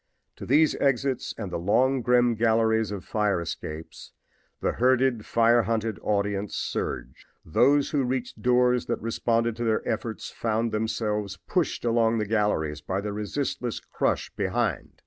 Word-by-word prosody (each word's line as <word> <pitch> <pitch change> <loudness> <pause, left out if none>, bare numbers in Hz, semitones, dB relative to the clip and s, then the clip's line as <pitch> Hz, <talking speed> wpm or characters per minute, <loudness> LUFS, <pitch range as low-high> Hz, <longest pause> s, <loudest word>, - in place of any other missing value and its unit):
To - - -8
these 150 +4 +4
exits 135 -1 0
and 105 -5 -5
the - - -2
long, 125 +9 +2
grim 120 0 +3
galleries 110 -1 +2
of 100 -3 -6
fire 105 -4 0
escapes 80 -1 -7 0.5
the - - 0
herded, 130 -2 +2
fire 115 +1 +4
hunted 115 0 -2
audience 100 -1 -1
surged. - - -4 0.2
Those 140 - +3
who 145 -3 +1
reached 125 0 -3
doors 125 0 +3
that - - -1
responded 115 0 0
to 120 - -3
their 110 -2 0
efforts 110 -1 -3
found 115 0 -1
themselves 105 -2 -2
pushed 175 -8 -1
along 115 -1 +2
the 105 - 0
galleries 100 -9 0
by 95 +4 -2
the 105 0 -4
resistless 120 +3 -3
crush - - -2
behind. - - -2
115 Hz, 145 wpm, -26 LUFS, 105-125 Hz, 0.5 s, these